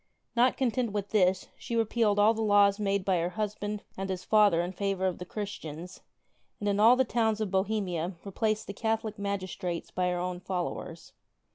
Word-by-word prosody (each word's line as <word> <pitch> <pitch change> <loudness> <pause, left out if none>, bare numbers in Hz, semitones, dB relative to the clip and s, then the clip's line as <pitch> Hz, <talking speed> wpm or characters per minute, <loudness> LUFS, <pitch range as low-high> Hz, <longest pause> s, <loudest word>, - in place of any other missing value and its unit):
Not 245 +2 +3
content 250 -4 0
with 200 -1 -3
this, 185 -3 +2
she 235 - -4
repealed 225 -2 +2
all 210 +2 +5
the 225 - -3
laws 205 -1 +4
made 200 -2 0
by 185 -3 +2
her 170 +1 0
husband 210 +1 -3
and 195 0 -4
his 185 -1 -3
father 210 -6 +4
in 175 - -4
favor 195 0 -1
of 185 -2 -1
the 180 - -6
Christians, 180 -4 -7 0.6
and 205 - -3
in 200 0 +1
all 230 +4 +7
the 260 +1 +2
towns 225 -2 +1
of 215 -3 -2
Bohemia 190 -3 -1
replaced 215 +2 -1
the 200 - -6
Catholic 220 0 -2
magistrates 185 -3 -3
by 180 0 0
her 180 - -1
own 180 0 -3
followers. 180 -1 -5
200 Hz, 185 wpm, -29 LUFS, 185-215 Hz, 0.6 s, all